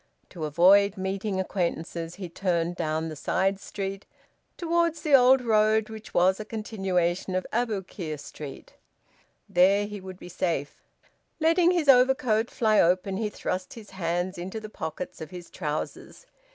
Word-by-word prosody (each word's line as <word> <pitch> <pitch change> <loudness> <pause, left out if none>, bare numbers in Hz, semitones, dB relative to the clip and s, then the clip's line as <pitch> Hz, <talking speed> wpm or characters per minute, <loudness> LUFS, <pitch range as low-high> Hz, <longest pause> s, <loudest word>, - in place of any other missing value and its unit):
To 160 -3 -5
avoid 190 +6 +5
meeting 190 +1 -2
acquaintances 170 -2 -3
he 185 -2 -6
turned 175 -1 -1
down 160 0 -2
the 155 - -6
side 195 +6 0
street, 195 -1 -6 0.5
towards 335 -2 0
the 300 - 0
old 260 0 +7
road 220 -2 +3
which 220 0 -9
was 185 +3 +3
a - - -3
continuation 190 -5 -1
of 185 - -1
Aboukir 195 -8 -2
Street. 145 -1 -10 0.7
There 195 +3 +4
he 205 -1 -7
would 185 -1 -9
be - - -11
safe. 165 -5 -3 0.6
Letting 335 +2 +4
his 345 -4 +1
overcoat 250 -4 +4
fly 215 -2 +2
open, 185 +2 +1
he 215 0 -1
thrust 185 -2 -4
his 220 -3 -12
hands 175 0 -2
into 190 +5 -5
the 215 0 -9
pockets 160 -3 -6
of 155 - -6
his 175 0 -10
trousers. 155 - -5
195 Hz, 150 wpm, -27 LUFS, 175-220 Hz, 0.7 s, old